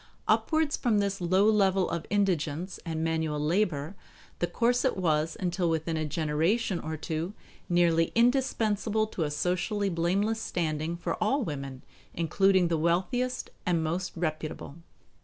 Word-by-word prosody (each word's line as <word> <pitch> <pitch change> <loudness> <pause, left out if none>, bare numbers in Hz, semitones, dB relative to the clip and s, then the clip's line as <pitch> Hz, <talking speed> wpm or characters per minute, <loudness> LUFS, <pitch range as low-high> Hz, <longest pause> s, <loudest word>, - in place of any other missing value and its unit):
Upwards 315 -2 +2
from 235 -5 +1
this 200 -1 0
low 185 +3 +3
level 195 -3 +3
of 165 -2 -4
indigence 180 -3 0
and 160 -2 -3
manual 160 -2 -1
labor, 160 0 0 0.4
the 175 - +1
corset 245 +6 +1
was 160 -3 0
until 175 -1 0
within 160 0 -1
a 155 -1 -1
generation 165 +7 0
or 160 0 -4
two 160 +6 -4 0.3
nearly 170 -2 +3
indispensable 225 -3 +2
to 185 -7 -3
a - - -2
socially 180 +7 -1
blameless 195 +6 0
standing 160 -2 -2
for 175 - -2
all 265 +6 +1
women, 140 - -5 0.3
including 185 +2 +3
the 165 -2 0
wealthiest 190 +10 0
and 170 -3 +1
most 175 +4 -2
reputable. 155 -3 -4
175 Hz, 140 wpm, -28 LUFS, 160-205 Hz, 0.4 s, low